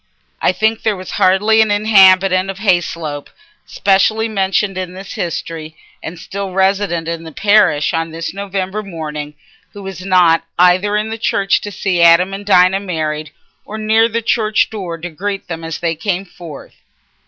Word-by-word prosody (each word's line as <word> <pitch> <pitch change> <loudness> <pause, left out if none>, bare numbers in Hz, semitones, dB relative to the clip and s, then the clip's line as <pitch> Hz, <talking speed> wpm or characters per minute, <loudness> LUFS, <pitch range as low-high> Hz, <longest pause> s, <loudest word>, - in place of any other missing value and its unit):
I - - +3
think 220 +4 0
there 220 -2 0
was 185 -1 -9
hardly 210 +4 +3
an 220 - +2
inhabitant 195 -3 +4
of 195 - -5
Hayslope 170 -7 -1 0.4
specially 210 +3 +1
mentioned 195 -1 -1
in 185 -1 -5
this 190 +1 -9
history 160 -2 -5 0.2
and 170 +2 -7
still 195 +3 -6
resident 190 -3 0
in 165 0 -4
the 160 - -9
parish 200 -5 +2
on 165 0 -1
this 165 +1 -6
November 195 +1 -4
morning 150 -6 -7 0.4
who 205 - -10
was 190 -2 -7
not 180 -3 +3
either 185 +4 +3
in 220 +1 -2
church 200 -2 +1
to 205 - -6
see 185 -3 -1
Adam 170 +3 +5
and 200 +1 -7
Dinah 185 0 +4
married, 155 -5 -4 0.3
or 215 - -8
near 220 +1 +2
the 230 +1 -2
church 215 -1 +1
door 185 -6 -5
to 175 +2 -7
greet 195 +4 -5
them 165 -2 -6
as 165 -1 -5
they 170 -2 -1
came 180 +3 -3
forth. 170 -5 -12
190 Hz, 165 wpm, -16 LUFS, 170-205 Hz, 0.4 s, Adam